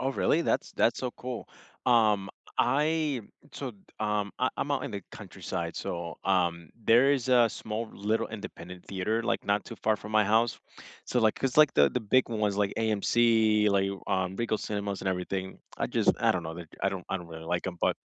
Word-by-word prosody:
Oh, 135 Hz, -, 0 dB
really? 165 Hz, +4 st, +2 dB
That's -, -, 0 dB
that's 115 Hz, -, +2 dB
so 125 Hz, -, -2 dB
cool. 125 Hz, -1 st, -6 dB, 0.4 s
Um, 105 Hz, -5 st, +4 dB, 0.3 s
I 150 Hz, +1 st, +2 dB, 0.3 s
so, 140 Hz, -, -5 dB, 0.3 s
um 105 Hz, -1 st, 0 dB
I -, -, +2 dB
I'm -, -, -2 dB
out -, -, 0 dB
in -, -, -4 dB
the -, -, -5 dB
countryside, -, -, -5 dB
so, 85 Hz, -1 st, -4 dB
um, 85 Hz, -4 st, +1 dB
there 120 Hz, +6 st, +6 dB
is 130 Hz, -2 st, -1 dB
a 120 Hz, -2 st, +6 dB
small 110 Hz, +1 st, -5 dB
little 105 Hz, +3 st, -1 dB
independent 90 Hz, -4 st, -9 dB
theater, 105 Hz, +4 st, -1 dB
like, -, -, -1 dB
not 100 Hz, 0 st, +1 dB
too -, -, -9 dB
far 110 Hz, 0 st, +1 dB
from 105 Hz, +1 st, -9 dB
my 110 Hz, 0 st, +5 dB
house. 110 Hz, +3 st, +2 dB, 0.5 s
So 125 Hz, -, 0 dB
like 110 Hz, -1 st, +3 dB
'cause 135 Hz, -2 st, -2 dB
like 150 Hz, -2 st, +6 dB
the 70 Hz, -1 st, +6 dB
the 125 Hz, -, -1 dB
big 120 Hz, +4 st, +2 dB
ones, 105 Hz, -3 st, 0 dB
like 100 Hz, -1 st, +1 dB
AMC, 110 Hz, 0 st, +3 dB
like, 100 Hz, -1 st, +2 dB, 0.2 s
um, 95 Hz, -1 st, -1 dB
Regal 115 Hz, -1 st, 0 dB
Cinemas 100 Hz, -2 st, -3 dB
and 95 Hz, -, -2 dB
everything, 95 Hz, +1 st, -3 dB, 0.2 s
I -, -, -1 dB
just -, -, +3 dB
I -, -, +4 dB
don't 90 Hz, -, -2 dB
know, 80 Hz, -, -4 dB, 0.3 s
I 95 Hz, -, +3 dB
don't 95 Hz, -2 st, -5 dB
I -, -, 0 dB
don't 90 Hz, -2 st, -9 dB
really 80 Hz, -1 st, -9 dB
like 85 Hz, +2 st, -1 dB
'em, 90 Hz, -2 st, -4 dB
but -, -, +2 dB
105 Hz, 200 wpm, -29 LUFS, 95-120 Hz, 0.5 s, there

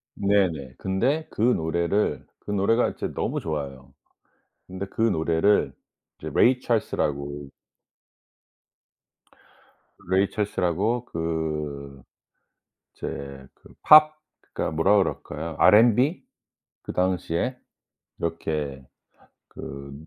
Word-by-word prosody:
네네. 90 Hz, -10 st, 0 dB
근데 130 Hz, +12 st, 0 dB
그 -, -, -6 dB
노래를 85 Hz, -3 st, +1 dB
그 105 Hz, -, -7 dB
노래가 105 Hz, +4 st, +2 dB
이제 -, -, -5 dB
너무 -, -, -2 dB
좋아요. 70 Hz, -4 st, -6 dB, 0.7 s
근데 95 Hz, +1 st, -5 dB
그 110 Hz, -, -6 dB
노래를 85 Hz, -1 st, +2 dB, 0.5 s
이제 -, -, -6 dB
레이 125 Hz, +1 st, +4 dB
찰스라고 70 Hz, -, -2 dB, 2.6 s
레이 95 Hz, +1 st, +3 dB
찰스라고 105 Hz, +3 st, -1 dB
그 75 Hz, -, -4 dB, 0.9 s
이제 70 Hz, -1 st, -7 dB
그 -, -, -20 dB
팝 155 Hz, 0 st, +8 dB, 0.4 s
그니까 -, -, -2 dB
뭐라 90 Hz, +7 st, +3 dB
그럴까요? 80 Hz, -4 st, -2 dB
R&B. 120 Hz, -, +5 dB, 0.6 s
그 -, -, -6 dB
당시에 90 Hz, +6 st, -1 dB, 0.6 s
이렇게 75 Hz, -5 st, -3 dB, 0.6 s
그 70 Hz, 0 st, -9 dB
85 Hz, 190 characters per minute, -25 LUFS, 75-105 Hz, 2.6 s, 팝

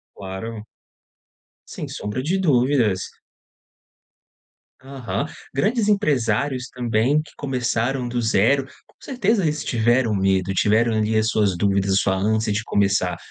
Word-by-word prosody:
Claro. 105 Hz, +3 st, -7 dB, 1.0 s
Sem -, -, -7 dB
sombra 105 Hz, +5 st, -4 dB
de 175 Hz, +7 st, 0 dB
dúvidas. 125 Hz, -, +2 dB, 1.8 s
Aham. 135 Hz, +1 st, -4 dB, 0.3 s
Grandes 215 Hz, -, +1 dB
empresários 130 Hz, -, 0 dB
também 125 Hz, +4 st, +1 dB
que 150 Hz, -, -16 dB
começaram 125 Hz, -1 st, -1 dB
do 120 Hz, 0 st, -2 dB
0, 115 Hz, +5 st, +2 dB, 0.2 s
com -, -, -29 dB
certeza 225 Hz, -5 st, 0 dB
eles 150 Hz, -1 st, -1 dB
tiveram 120 Hz, 0 st, +2 dB
medo, 95 Hz, -1 st, +1 dB
tiveram 110 Hz, +4 st, +2 dB
ali 110 Hz, 0 st, 0 dB
as 110 Hz, 0 st, +2 dB
suas 100 Hz, -5 st, +1 dB
dúvidas, 100 Hz, 0 st, +1 dB
a 95 Hz, -, +3 dB
sua 95 Hz, -1 st, +2 dB
ânsia 110 Hz, +2 st, 0 dB
de 110 Hz, +2 st, -2 dB
começar, 100 Hz, -2 st, +1 dB
115 Hz, 125 wpm, -22 LUFS, 105-135 Hz, 1.8 s, a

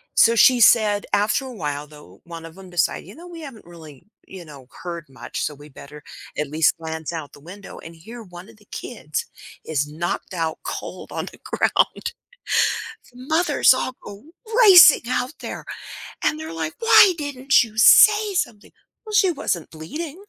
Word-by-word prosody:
so, 230 Hz, 0 st, +5 dB
she 250 Hz, +1 st, +5 dB
said 210 Hz, -2 st, +4 dB
after 210 Hz, +6 st, +1 dB
a 255 Hz, -, -9 dB
while 150 Hz, -5 st, -5 dB
though, 150 Hz, -11 st, -17 dB
one 165 Hz, -1 st, -10 dB
of 165 Hz, +3 st, -13 dB
‘em 190 Hz, -1 st, -13 dB
decided, 175 Hz, 0 st, -2 dB
you 200 Hz, -, -13 dB
know, 340 Hz, -, -13 dB
we 340 Hz, -2 st, -10 dB
haven't 270 Hz, -8 st, -11 dB
really, 160 Hz, -6 st, -14 dB, 0.2 s
you 185 Hz, -2 st, -11 dB
know, 140 Hz, -4 st, -14 dB, 0.2 s
heard 170 Hz, -2 st, -6 dB
much, 130 Hz, -, -8 dB
so, 150 Hz, -, -3 dB
we 145 Hz, +1 st, -15 dB
better 145 Hz, +1 st, -13 dB, 0.3 s
at 150 Hz, -2 st, -3 dB
least 155 Hz, +2 st, +1 dB
glance 160 Hz, 0 st, -6 dB
out 160 Hz, -3 st, -7 dB
the -, -, -15 dB
window, 185 Hz, +6 st, -12 dB
and 165 Hz, 0 st, -12 dB
here 225 Hz, +9 st, -12 dB
one 180 Hz, 0 st, -13 dB
of 225 Hz, -, -18 dB
the 210 Hz, -, -24 dB
kids 185 Hz, -11 st, -6 dB, 0.4 s
is 150 Hz, -2 st, -2 dB
knocked 175 Hz, +4 st, -4 dB
out 165 Hz, -3 st, -3 dB
cold -, -, -7 dB
on -, -, -4 dB
the -, -, -18 dB
ground. 470 Hz, -, 0 dB, 1.0 s
The 245 Hz, -, -19 dB
mothers 315 Hz, -4 st, +3 dB
all 255 Hz, 0 st, -4 dB
go 205 Hz, +4 st, -12 dB, 0.4 s
racing 360 Hz, -7 st, +8 dB
out 255 Hz, +3 st, -2 dB
there -, -, -7 dB, 0.6 s
and 310 Hz, -, 0 dB
they're 315 Hz, -, -8 dB
like, 160 Hz, -1 st, -5 dB
“Why 415 Hz, -4 st, +6 dB
didn't 275 Hz, -3 st, +1 dB
you 225 Hz, -2 st, -10 dB
say 420 Hz, -, +6 dB
something?!” 215 Hz, -11 st, -4 dB, 0.3 s
“Well, 430 Hz, -, -9 dB
she 385 Hz, -3 st, +3 dB
wasn't 175 Hz, -, -4 dB
bleeding." 300 Hz, -, -8 dB
195 Hz, 180 wpm, -21 LUFS, 160-265 Hz, 1.0 s, racing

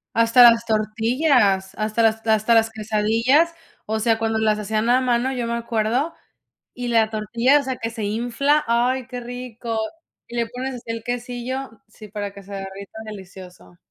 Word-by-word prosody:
Hasta 230 Hz, +2 st, +6 dB
las 230 Hz, 0 st, +1 dB
tortillas, 215 Hz, -2 st, +1 dB
hasta 215 Hz, +1 st, 0 dB
las 225 Hz, 0 st, +2 dB
hasta 220 Hz, +1 st, +3 dB
las 225 Hz, 0 st, +4 dB
quesadillas. 225 Hz, +9 st, +2 dB, 0.3 s
O 220 Hz, +1 st, -2 dB
sea, 225 Hz, 0 st, +2 dB
cuando 225 Hz, 0 st, -1 dB
las 215 Hz, -1 st, +2 dB
hacían 215 Hz, +2 st, -1 dB
a 255 Hz, +1 st, +4 dB
mano, 250 Hz, +1 st, +1 dB
yo 245 Hz, -2 st, -2 dB
me 235 Hz, 0 st, -2 dB
acuerdo. 235 Hz, +6 st, -1 dB, 0.6 s
Y 245 Hz, -1 st, -5 dB
la 225 Hz, -2 st, +3 dB
tortilla, 235 Hz, +6 st, +2 dB
o -, -, -4 dB
sea, 260 Hz, -1 st, -3 dB
que 225 Hz, -1 st, -4 dB
se 225 Hz, -3 st, -5 dB
infla. 245 Hz, +7 st, +1 dB
Ay, 245 Hz, +2 st, +1 dB
qué 250 Hz, -1 st, -6 dB
rico. 240 Hz, -2 st, -6 dB, 0.5 s
Y 240 Hz, -, -6 dB
le 235 Hz, -1 st, 0 dB
pones 250 Hz, 0 st, -5 dB
el 230 Hz, 0 st, -4 dB
así -, -, -20 dB
quesillo 245 Hz, 0 st, -5 dB
sí, 215 Hz, 0 st, -13 dB
para 205 Hz, -1 st, -5 dB
que 200 Hz, 0 st, -12 dB
se 200 Hz, +1 st, -11 dB
derrita. 195 Hz, +2 st, -8 dB
Delicioso. 185 Hz, -, -11 dB
230 Hz, 175 wpm, -22 LUFS, 215-245 Hz, 0.6 s, Hasta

